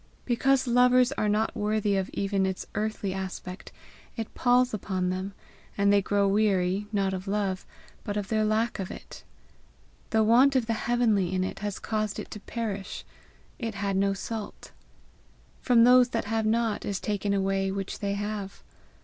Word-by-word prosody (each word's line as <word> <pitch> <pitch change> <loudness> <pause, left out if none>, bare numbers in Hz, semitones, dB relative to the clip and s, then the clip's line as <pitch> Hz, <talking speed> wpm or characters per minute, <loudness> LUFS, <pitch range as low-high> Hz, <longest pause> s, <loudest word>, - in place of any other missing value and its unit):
Because 265 +2 +2
lovers 250 +1 +4
are 215 -6 0
not 215 +2 0
worthy 210 -1 0
of 190 -1 -1
even 195 -1 0
its 190 -1 -4
earthly 210 -2 -2
aspect, 190 -1 -6 0.5
it 225 -1 -5
palls 250 0 +3
upon 185 -3 -1
them, 190 +2 -4 0.4
and 200 0 +4
they 200 - +5
grow 200 +1 +1
weary, 195 -1 +1
not 195 -2 0
of 185 +1 -5
love, 195 -2 -1 0.4
but 205 0 -3
of 205 -2 -2
their 215 0 +1
lack 215 +2 0
of 190 - -3
it. - - -10 0.9
The 220 -1 +3
want 250 +5 +5
of 255 -3 +2
the 230 - 0
heavenly 220 -5 +1
in 185 -1 0
it 185 - -4
has 205 -1 -3
caused 215 -2 -2
it - - -7
to 210 - -6
perish: 205 -3 -5 0.5
it 225 -3 -4
had 200 0 -1
no 195 +1 +2
salt. 215 +2 -6 0.9
From 235 -2 +5
those 250 0 +6
that 230 -3 -2
have 220 +1 0
not 225 -1 +1
is 195 -2 -2
taken 205 -1 -2
away 195 -1 +1
that 190 - -3
which 195 -1 -4
they 200 -1 -1
have. 205 -1 -5
205 Hz, 175 wpm, -27 LUFS, 195-225 Hz, 0.9 s, those